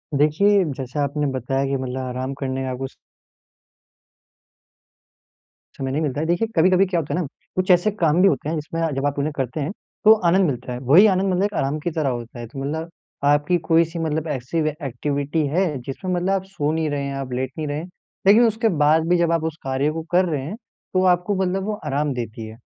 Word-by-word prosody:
देखिए 190 +8 +4
जैसा 135 +2 -3
आपने 145 +1 -1
बताया 135 +1 -1
कि 135 0 0
मतलब 130 0 -4
आराम 130 +1 -4
करने 135 -1 -2
का 130 -1 -3
कुछ 135 +1 -6 2.8
समय 135 -1 -3
नहीं 145 +4 -1
मिलता 145 -2 -1
है। 160 - -1
देखिए 175 +7 +1
कभी-कभी 185 +3 +5
क्या 180 -2 0
होता 155 - -4
है - - 0
ना, - - -2 0.3
कुछ 185 0 +2
ऐसे 180 +4 +4
काम 170 -4 +2
भी 195 - +7
होते 155 - 0
हैं 165 - -1
जिसमें 160 +2 -4
जब 135 +1 -1
आप 145 0 -1
उन्हें 150 +2 -1
करते 135 +2 -2
हैं, 150 +4 -2 0.3
तो 215 - +10 0.2
आनंद 190 +2 +4
मिलता 125 -1 -4
है। 125 - -5
वही 145 - +6
आनंद 190 -1 +2
मतलब 200 +3 0
आराम 140 +3 0
की 170 +3 -3
तरह 155 -4 0
होता 120 -1 -5
है। 120 - -6
तो 130 +4 -9
मतलब 160 +4 -3 0.4
आपकी 145 +4 +3
कोई 165 0 +6
सी 165 +1 -7
मतलब 160 0 -1
ऐसी 135 +1 -3
एक्टिविटी 145 +1 -2
है, 175 +7 +1 0.2
जिसमें 160 +9 -4
मतलब 180 +1 0
आप 195 -1 +1
सो 165 -6 -2
नहीं 160 -1 0
रहे 145 -1 -2
हैं, 140 0 -3
आप 135 -2 -5
लेट 130 +1 -2
नहीं 155 -1 -3
रहे 145 +2 -3 0.4
लेकिन 215 +4 +7
उसके 225 0 +2
बाद 155 +2 +3
भी 180 - +4
जब 170 -1 +2
आप 165 -1 +1
उस 160 -1 -3
कार्य 135 +2 0
को 165 +1 -4
कर 180 +1 +4
रहे 155 -6 -1
हैं, 175 +8 -5 0.4
तो 185 0 +3
आपको 180 +4 -3
मतलब 190 +1 -1
वो 215 - -1
आराम 145 0 0
देती 115 -2 -5
है? 110 +1 -11
150 Hz, 220 wpm, -22 LUFS, 135-175 Hz, 2.8 s, तो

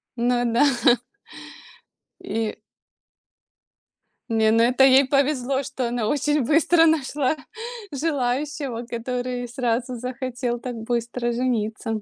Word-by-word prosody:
Ну 245 0 +1
да. 235 - +4 1.6
И 225 -1 -3 1.7
Не, 220 -1 +3
ну 230 +1 +4
это 255 +3 +4
ей 270 0 +6
повезло, 275 -1 +1
что 265 -3 -3
она 235 -3 -1
очень 295 +2 +1
быстро 325 +3 +4
нашла 295 -2 +1 0.6
желающего, 275 -3 -2
который 245 +1 -4
сразу 245 0 -2
захотел 250 0 -3
так 245 0 -6
быстро 235 +1 -2
жениться. 225 -2 -2
250 Hz, 100 wpm, -23 LUFS, 235-275 Hz, 1.7 s, ей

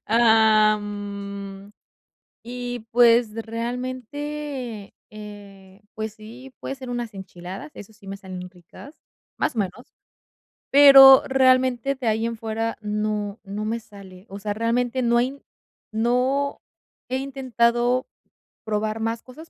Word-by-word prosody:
am, 205 -3 +1 0.7
y 245 -1 -6
pues, 235 -2 +5
realmente, 250 +1 -5 0.2
eh, 205 -2 -12
pues 220 0 -4
sí, 235 +5 -12
puede - - -5
ser 260 -2 -9
unas 240 -3 -4
enchiladas, 190 - -9
eso 205 +2 -11
sí 205 -2 -19
me 195 0 -7
salen 185 -2 -8
ricas, 180 - -15 0.4
más - - -1
o - - -2
menos. 200 +5 -6 0.8
Pero, 270 -1 +9
realmente, 260 0 +3
de 260 -3 -5
ahí 220 +1 +1
en 230 0 -2
fuera 225 0 -3
no 210 0 -3
no 205 +1 -5
me 225 +2 -2
sale. 195 -3 -14
O 200 - -8
sea, 205 0 -3
realmente 240 +3 0
no 235 -1 +2
hay 260 +4 -1 0.5
no 250 +5 0 0.5
he 255 - -2
intentado 250 -2 0 0.6
probar 215 +1 -2
más 225 +1 -3
cosas, 310 +6 -13
225 Hz, 125 wpm, -23 LUFS, 205-250 Hz, 0.8 s, Pero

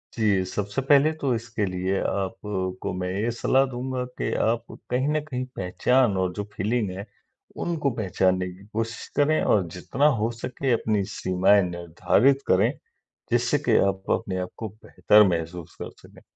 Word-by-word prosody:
जी, 105 -5 +2
सबसे 100 +5 -3
पहले 145 +3 +4
तो 135 -3 +1
इसके 115 -2 -3
लिए 95 +1 -1
आपको 95 -2 -3
मैं 90 0 -3
ये 105 +5 -1
सलाह 130 +3 +2
दूँगा 125 +1 -3
कि - - -2
आप 115 +1 +1 0.3
कहीं 130 +3 +1
न 155 0 +1
कहीं 130 -4 -4
पहचान 105 +5 +2
और 95 -1 0
जो 105 - -3
फ़ीलिंग 105 +1 -1
है 95 +2 -6 0.6
उनको 160 -5 0
पहचानने 95 -2 +1
की 95 +2 -15
कोशिश 115 +1 -3
करें 150 +2 +3
और 95 -5 +2
जितना 135 +10 -1 0.2
हो 115 +2 +1
सकें 125 +3 -3
अपनी 110 -3 +1
सीमाएँ 95 +2 +3
निर्धारित 85 +10 +2
करें, - - +4 0.6
जिससे - - +2
कि - - +5
आप 95 0 -3
अपने 95 -2 -1
आप 90 0 -3
को 110 - -5
बेहतर 105 0 +3
महसूस 85 -1 -3
कर - - -6
सकें, - - -17
105 Hz, 160 wpm, -25 LUFS, 95-125 Hz, 0.6 s, कि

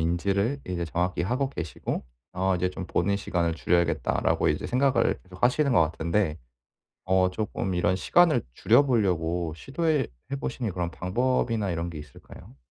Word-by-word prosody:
인지를 100 - 0
이제 90 -1 -2
정확히 90 +3 -1
하고 125 +9 0
계시고 80 - -4 0.3
'어 95 +1 +1
이제 90 +1 0
좀 90 0 -6
보는 100 +3 +1
시간을 85 -4 -1
줄여야겠다.'라고 85 0 +1
이제 - - -1
생각을 125 -2 +2
계속하시는 125 +10 +1
것 110 - +5
같은데 85 +2 0 0.7
어 95 0 +3
쪼끔 95 -1 -3
이런 90 +1 +2
시간을 150 - +3
줄여 120 - +5
보려고 90 - 0
시도해 145 - -1 0.2
해 - - 0
보시는 120 -5 -3
그런 90 -1 -2
방법이나 115 +3 0
이런 85 0 -2
게 85 -3 -7
있을까요? 75 -2 -13
95 Hz, 360 characters per minute, -26 LUFS, 85-120 Hz, 0.7 s, 것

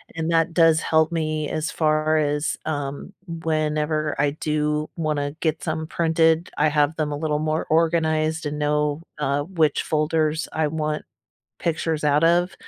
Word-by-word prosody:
and 165 0 -2
that 165 0 +2
does 165 -1 +5
help 160 0 +2
me, 155 -2 -1
as 155 0 -2
far 155 0 +2
as, 150 0 0
um, 145 +3 -4
whenever 155 -2 -1
I 145 -1 +2
do 150 0 -1
wanna 150 -3 -2
get 155 -3 -1
some 160 0 -2
printed, 165 0 +2
I 150 +1 +3
have 150 +1 +2
them 155 -2 -2
a 145 - -3
little 150 0 -1
more 155 +1 -1
organized 160 -1 +1
and 150 0 -4
know, 150 +1 0 0.2
uh, 145 -1 0
which 160 -3 +1
folders 155 0 0
I 160 0 0
want 155 0 -2 0.6
pictures 160 -2 -1
out 150 +1 +3
of. 175 +2 +3
155 Hz, 155 wpm, -23 LUFS, 150-160 Hz, 0.6 s, does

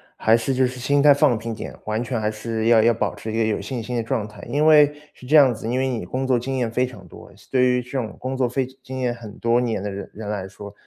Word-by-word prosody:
还 110 +1 +3
是 125 +4 -1
就 130 0 +3
是 125 0 -8
心 140 +3 +2
态 145 0 +7
放 140 -5 +3
平 115 +1 -5
点， - - -7
完 110 +2 -1
全 120 -1 -2
还 105 0 0
是 110 +1 -3
要 115 -2 +6
要 115 +1 +4
保 110 - -2
持 110 - -6
一 110 - -3
个 115 - +2
有 110 -1 0
信 125 -4 -4
心 125 +2 -5
的 115 - 0
状 115 -2 -2
态。 105 - -13
因 150 +2 +1
为 150 -2 +6 0.2
是 - - -15
这 150 +5 +2
样 135 -4 +7
子， 110 0 -7
因 125 +2 0
为 135 - +1
你 115 -8 -3
工 130 +8 -3
作 125 -2 +3
经 135 +2 -3
验 120 -3 0
非 125 +2 +1
常 100 -8 -11
多， - - -14
像 - - -21
对 130 -1 +3
于 125 0 +2
这 125 - -14
种 125 -5 -3
工 130 +1 -4
作 130 -1 +1
非 130 +2 -1 0.2
经 130 0 -6
验 125 -1 0
很 115 -3 -11
多 115 +1 +2
年 115 -5 -1
的 105 - -3
人 100 0 -7
人 105 -1 -7
来 100 -3 -3
说， 100 +1 -11
120 Hz, 325 characters per minute, -22 LUFS, 110-130 Hz, 0.2 s, 态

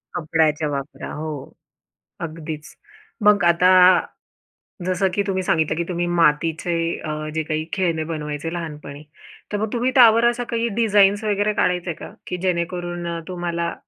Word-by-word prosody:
कपड्याच्या 155 -2 +1
वापरा, 140 0 -5
हो. 150 -3 -6 0.7
अगदीच. 155 -2 -7 0.5
मग 205 -3 +5
आता 175 +2 +4 1.2
जसं 185 +1 +1
की 200 - +1
तुम्ही 190 -1 -1
सांगितलं 160 -3 +1
की 170 - -1
तुम्ही 175 -1 -1
मातीचे 165 0 +1 0.3
अ, 155 0 -4
जे 160 - 0
काही 155 0 -2
खेळणे 170 -5 0
बनवायचे 155 0 -4
लहानपणी. 150 -3 -7 0.5
तर - - 0
मग 215 0 -3
तुम्ही 245 +2 +1
त्यावर 230 -2 +7
अशा 240 0 -1
काही 235 0 0
डिझाईन्स 205 -2 +4
वगैरे 205 0 +1
काढायचंय 180 -3 0
का? - - -10 0.2
की 180 - -3
जेणेकरून 175 -1 -2
अ, 170 0 -3
तुम्हाला 170 -1 -3
170 Hz, 145 wpm, -22 LUFS, 155-195 Hz, 1.2 s, त्यावर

